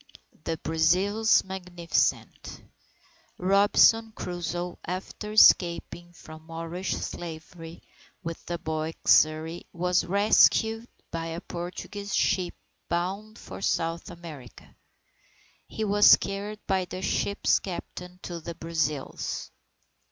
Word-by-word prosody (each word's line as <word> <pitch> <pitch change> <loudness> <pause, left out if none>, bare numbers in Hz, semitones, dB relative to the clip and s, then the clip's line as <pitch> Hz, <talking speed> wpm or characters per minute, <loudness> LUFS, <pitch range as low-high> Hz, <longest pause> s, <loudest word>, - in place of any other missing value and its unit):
THE 165 - -2
BRAZILS 190 +7 +3
MAGNIFICENT 180 -3 -2 0.7
Robinson 205 +4 +4
Crusoe, 175 0 -4
after 190 +3 -6
escaping 175 -3 +4
from 155 -2 -13
Moorish 165 +3 -4
slavery 165 0 -8 0.4
with 165 -1 -6
the 175 - -2
boy 160 0 -3
Xury, 155 +2 +3
was 180 +1 +1
rescued 220 +4 +3 0.2
by 165 -1 -3
a 165 +1 -5
Portuguese 195 +3 -6
ship 180 -2 +1 0.3
bound 195 +6 -3
for - - -10
South 165 -3 -1
America. 155 -8 -12 0.9
He 220 - -4
was 205 0 +7
carried 205 +2 -6
by 190 -2 0
the 185 +1 -7
ship's 200 +1 +1
captain 180 -1 -8
to 175 -1 -5
the 165 +1 -7
Brazils. 160 -4 -3
175 Hz, 100 wpm, -27 LUFS, 165-195 Hz, 0.9 s, was